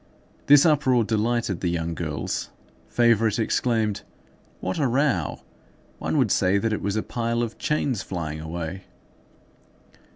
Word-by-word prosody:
This 145 +1 +7
uproar 135 -6 +3
delighted 110 -3 0
the 90 - 0
young 85 -1 -2
girls. - - -3 0.4
Favourite 115 - +3
exclaimed:— 110 -2 0 0.6
"What 95 +8 -3
a 140 - +2
row! 125 - 0 0.6
One - - -1
would - - +2
say 95 +2 +3
that 110 +2 0
it - - -2
was 100 +1 -1
a 110 - 0
pile 115 0 -1
of 115 -1 -5
chains 140 -7 0
flying 80 -5 -5
away." 85 +3 -5
110 Hz, 135 wpm, -24 LUFS, 90-120 Hz, 0.6 s, This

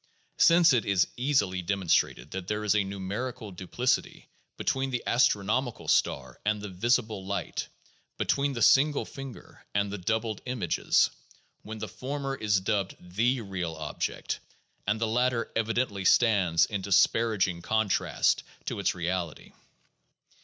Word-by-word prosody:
Since 165 -3 +6
it 120 -4 +2
is 95 -2 +2
easily 110 -9 +1
demonstrable 95 -1 +1
that 95 -1 -5
there 105 +1 -2
is 105 - +3
a 105 -1 +2
numerical 100 +4 -5
duplicity 95 +8 -2 0.3
between 135 0 -1
the 125 -3 -2
astronomical 120 -1 +1
star 65 -2 +1
and 105 0 0
the 105 0 -6
visible 110 +1 0
light, 100 +1 -3 0.5
between 140 0 +1
the 115 -3 -1
single 145 +4 +4
finger 135 -2 -10
and 100 0 +1
the 105 - -5
doubled 110 +3 -1
images, 120 -10 +1 0.5
when 110 +1 -8
the 110 0 -5
former 135 +6 -4
is 105 -6 +1
dubbed 100 -1 -1
"the" 115 +8 0
real 90 -5 -4
object 75 -1 -4 0.5
the 110 +2 0
latter 120 +1 0
evidently 115 -3 0
stands 95 -7 +4
in 105 -3 -4
disparaging 100 -1 +2
contrast 110 +1 +1 0.2
to - - -3
its - - 0
reality. 85 -2 -3
105 Hz, 130 wpm, -28 LUFS, 95-120 Hz, 0.5 s, Since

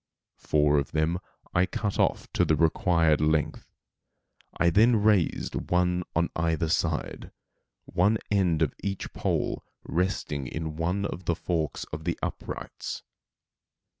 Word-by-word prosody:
Four 75 -1 +3
of 70 - -4
them 80 +3 +1 0.3
I 90 +1 +3
cut 105 +1 -2
off - - +1
to - - +3
the 80 - +3
required 80 -1 +3
length. 75 0 0 0.9
I 85 0 +4
then 115 +7 +5
raised 105 -5 +1
one 90 0 +2
on 85 0 +1
either 80 -1 0
side, 85 -2 -1 0.6
one 100 +5 +2
end 90 -6 +3
of 75 - 0
each 100 -1 -4
pole - - -1 0.2
resting 80 -6 -1
in 80 +2 -4
one 90 +5 -1
of 90 -2 -5
the 85 - +1
forks 80 -3 -2
of - - -5
the - - -1
uprights. - - -5
85 Hz, 135 wpm, -27 LUFS, 80-90 Hz, 0.9 s, then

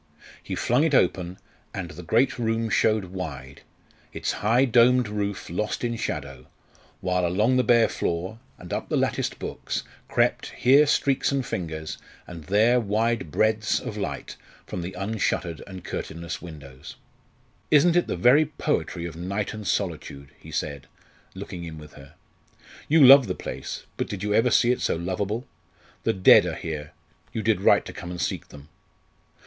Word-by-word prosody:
He - - -5
flung 125 +5 +2
it 160 -3 +2
open, 90 -3 +1 0.4
and 90 -4 -5
the 80 - -9
great 120 +10 +1
room 115 -1 -1
showed 110 -3 +2
wide, 70 -7 -7 0.5
its - - -2
high 115 +5 +2
domed 125 0 +4
roof 100 -1 -3
lost 105 +8 -3
in 120 -1 -1
shadow, - - -5 0.5
while 90 -1 0
along 105 +9 +2
the 125 - +3
bare 120 -2 +5
floor 90 +6 -3 0.2
and 90 - -8
up - - -3
the - - +1
latticed - - -1
books - - -4 0.2
crept, - - +1
here 140 +4 +5
streaks 140 -1 +2
and 135 -2 -1
fingers, 80 -5 -5 0.3
and 85 -3 -10
there 110 +7 +4
wide 110 -2 0
breadths 110 +6 +1
of 105 - -6
light 100 -2 -5 0.3
from 90 - -5
the 90 +2 -6
unshuttered 95 -5 -2
and 95 -2 -9
curtainless 85 +1 -5
windows. 70 -6 -11 0.7
"Isn't 160 +3 +5
it 175 - +3
the - - -2
very 140 +5 +5
poetry 115 - -2
of 85 -2 -6
night 95 +4 -3
and 105 -2 -7
solitude?" 75 -7 -3
he - - -13
said, 70 -2 -4 0.5
looking 85 - -7
in 80 -2 -7
with 75 -1 -12
her. 70 +2 -15 0.7
"You 155 -2 +6
love 135 0 +9
the - - -2
place; - - -6
but - - -2
did 100 -2 -5
you 105 0 0
ever 115 +4 +4
see 120 +1 +4
it 125 - -1
so - - +1
lovable? 95 +7 -3 0.6
The - - +2
dead 95 -1 +6
are - - -3
here; 75 -2 -6 0.4
you 110 - -3
did 110 -2 +2
right - - +4
to - - -8
come 85 - -8
and 90 0 -6
seek - - -2
them! 70 0 -13
100 Hz, 170 wpm, -25 LUFS, 85-120 Hz, 0.7 s, love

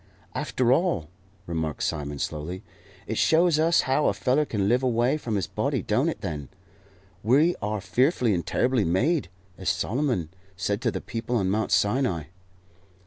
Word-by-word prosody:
"After 125 -1 +1
all," 150 - 0 0.4
remarked 80 -3 -3
Simon, 75 0 -2
slowly, 80 +7 -4 0.4
"it 110 - -2
shows 165 -1 +4
us 165 +2 +4
how 135 +3 +1
a - - +3
feller 135 +4 +2
can 100 -7 -1
live 120 +4 +3
away 125 +1 +2
from 120 -8 -3
his 95 - 0
body, - - -2
don't - - +1
it, - - -5
then? 75 -3 -5 0.7
We 145 - +4
are 105 0 -1
fearfully 120 - +2
and 85 -2 -1
terribly 125 +7 +1
made, 120 - +1 0.3
as 95 - -1
Solomon 120 - 0 0.3
said 100 +2 -1
to - - +1
the - - -4
people 115 +2 -4
on 95 -5 +1
Mount 110 +2 0
Sinai." 105 - +1
115 Hz, 160 wpm, -26 LUFS, 95-130 Hz, 0.7 s, shows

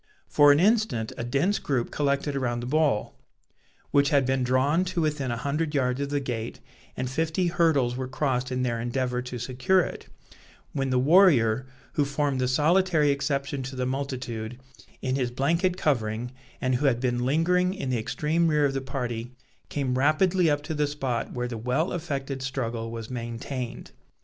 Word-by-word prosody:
For 145 -1 +6
an 145 - +4
instant 210 - +2
a - - -4
dense 140 - +1
group 130 -4 -1
collected 140 0 0
around 120 -3 -1
the - - -5
ball, 145 -5 0 0.7
which 140 0 +4
had 140 -3 +3
been 130 0 +1
drawn 130 +7 +2
to 180 -2 -1
within 150 -4 -1
a 120 - -2
hundred 150 +4 -2
yards 130 -1 +1
of 140 - -2
the 145 0 0
gate, 120 -2 -4 0.4
and 125 - -2
fifty 160 +6 0
hurdles 160 -8 +2
were 130 0 -3
crossed 130 -1 -1
in 125 0 -1
their 120 -2 -1
endeavour 125 +1 -1
to 125 0 -6
secure 130 +10 +2
it, - - -6 0.7
when 135 -1 -1
the 130 - +2
warrior, 130 - +5 0.3
who 145 - +2
formed 140 -1 -1
the 125 - +1
solitary 155 +2 +3
exception 140 0 -1
to 130 +1 -6
the 130 -1 -1
multitude, 125 -3 -4 0.4
in 130 - 0
his 130 -3 0
blanket 170 +9 +1
covering, 120 -5 0 0.3
and 130 -1 0
who 145 +3 +1
had 120 -3 +2
been 120 -1 0
lingering 180 +7 +2
in 135 -8 -3
the 120 - +1
extreme 155 +9 0
rear 150 -2 +3
of 135 - 0
the 135 - -2
party, 125 -3 -4 0.4
came 130 -3 -1
rapidly 170 +5 +3
up 145 0 0
to 160 - -4
the 150 -1 +1
spot 135 -5 -3
where 125 -1 -3
the 115 -2 -5
well 125 - 0
affected 140 -5 -3
struggle 120 -4 -3
was 115 0 -7
maintained. 120 +1 -5
135 Hz, 180 wpm, -26 LUFS, 125-150 Hz, 0.7 s, For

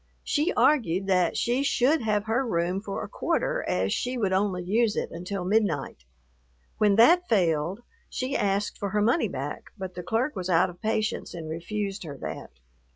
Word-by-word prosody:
She 310 +5 +1
argued 195 - +3
that 180 -3 +2
she 245 +3 +1
should 280 +2 +2
have 210 -2 0
her 225 +4 0
room 180 -4 -1
for 200 -2 -4
a - - -5
quarter, - - -1
as 95 +2 0
she 250 +1 -2
would 200 -5 0
only 190 -2 0
use 215 +4 +1
it - - -2
until 180 +2 -5
midnight. 180 - 0 0.7
When 210 -2 +4
that 345 - +5
failed, 175 -1 +1 0.3
she 260 +2 -3
asked 200 +1 0
for 200 - -2
her 210 +2 0
money 240 +9 +2
back, - - -5
but 190 -2 -6
the 180 - -6
clerk 225 - -1
was 185 -1 -4
out 180 +1 +3
of 175 - -19
patience 215 -3 -1
and 165 -2 -6
refused 195 +5 -4
her 145 -4 -7
that. - - -6
200 Hz, 180 wpm, -26 LUFS, 180-225 Hz, 0.7 s, that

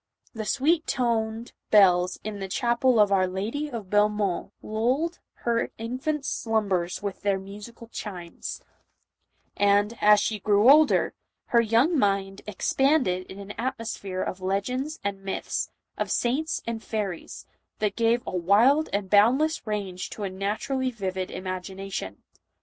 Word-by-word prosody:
The 220 -2 -5
sweet 310 +8 +1
toned 230 -1 -1 0.2
bells 180 -3 +5
in 210 -1 -5
the 195 - -4
chapel 240 +3 +2
of 205 -1 +5
our 190 -1 +3
Lady 220 +11 -3
of 225 -8 -7
Belle 210 0 +5
mont 200 -3 -2
lulled 255 +10 -1 0.3
her 235 -1 +1
infant 260 +6 -3
slumbers 200 -9 -1
with 200 -2 -4
their 200 -1 +1
musical 205 +5 -10
chimes; 180 -7 -7 0.9
and, 205 +2 +3
as 210 0 +7
she 215 0 -1
grew 210 +5 +5
older, 305 +1 +5 0.4
her 235 - +7
young 235 +9 +3
mind 195 -2 0
ex 205 -3 -2
panded 265 -11 +2
in 190 - -10
an 200 0 -8
atmosphere 225 -7 -3
of 185 - -5
legends 250 +11 -2
and 200 -1 -3
myths, 195 - -3 0.3
of - - -1
saints 280 +7 0
and 230 -1 -4
fairies, 200 -6 -4 0.3
that 210 -2 -1
gave 235 +1 +2
a - - -4
wild 225 - +4
and 200 -1 -1
boundless 245 +10 +3
range 195 -4 -3
to 210 - -7
a 195 - -2
naturally 215 +7 -2
vivid 190 -5 -4
imagination. 185 - -6
210 Hz, 145 wpm, -26 LUFS, 195-240 Hz, 0.9 s, as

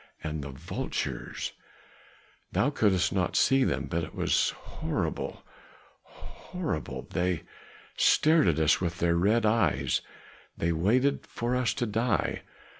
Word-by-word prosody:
And 75 -1 -3
the 70 - -6
vultures 65 -1 -4 1.0
thou 145 - +2
could'st 100 -9 +2
not 95 -2 0
see 135 0 +4
them, 75 - 0
but 80 +4 -2
it - - -8
was - - +2
horrible - - -4 0.6
horrible! 165 - -6
They 90 -1 0 0.5
stared 155 - +4
at 80 -3 +2
us 80 +1 +3
with 85 -1 -2
their 85 -1 +2
red 105 +6 +3
eyes, 70 - +2 0.6
they 85 - 0
waited 115 - +1
for 120 +1 -2
us 125 -2 +1
to 120 - -1
die. 110 0 0
95 Hz, 125 wpm, -28 LUFS, 80-120 Hz, 1.0 s, see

